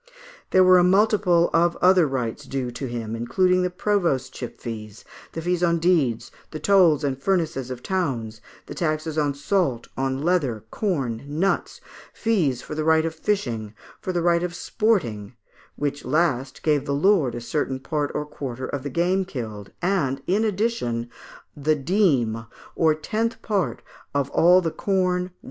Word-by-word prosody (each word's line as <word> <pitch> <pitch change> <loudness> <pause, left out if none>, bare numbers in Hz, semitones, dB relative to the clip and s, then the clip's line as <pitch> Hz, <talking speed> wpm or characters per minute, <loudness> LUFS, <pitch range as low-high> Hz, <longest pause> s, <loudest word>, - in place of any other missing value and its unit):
There 185 - +5
were 185 0 +7
a - - +4
multitude 190 -2 +3
of 170 +1 +3
other 180 -3 +5
rights 130 +1 -3
due 130 -2 -3
to 130 +3 -5
him, 115 -2 -4
including 180 +11 +2
the 180 - +1
provostship 165 - -1
fees, 110 -2 -8 0.3
the 165 - -5
fees 180 0 0
on 170 -1 +3
deeds, 150 -9 +1 0.2
the 155 - -6
tolls 175 -7 +4
and 135 -2 -2
furnaces 160 -8 0
of 125 -1 -7
towns, 120 - -2 0.2
the - - -8
taxes 155 -1 -1
on 145 -2 0
salt, 145 - -1
on 135 +1 -2
leather, 145 - 0
corn, 135 - -1
nuts; 165 +7 -1 0.3
fees 165 - 0
for - - -7
the 155 0 -2
right 160 0 +3
of 165 - -2
fishing; 120 - -2 0.2
for 185 - -3
the 175 -2 -1
right 170 -1 +3
of 175 0 -3
sporting, 130 - -1 0.4
which 145 0 -3
last 140 -5 0
gave 150 -3 +2
the 140 - 0
lord 155 - +3
a - - -3
certain 130 +2 -2
part 145 +1 -2
or 150 - -1
quarter 130 -4 -6
of 140 +1 -4
the 145 - -5
game 180 +7 +1
killed, 110 - -7
and, 140 -8 0
in 200 +5 +1
addition, 195 - -1 0.4
the 150 +2 +1
dîme 135 - +1 0.3
or 160 -2 +3
tenth 220 +9 -2
part 190 - -1 0.3
of 140 -1 0
all 180 +2 +5
the 165 -2 -1
corn, 185 -1 0
wine, - - -10
&c. 180 - -33
155 Hz, 165 wpm, -24 LUFS, 130-180 Hz, 0.4 s, were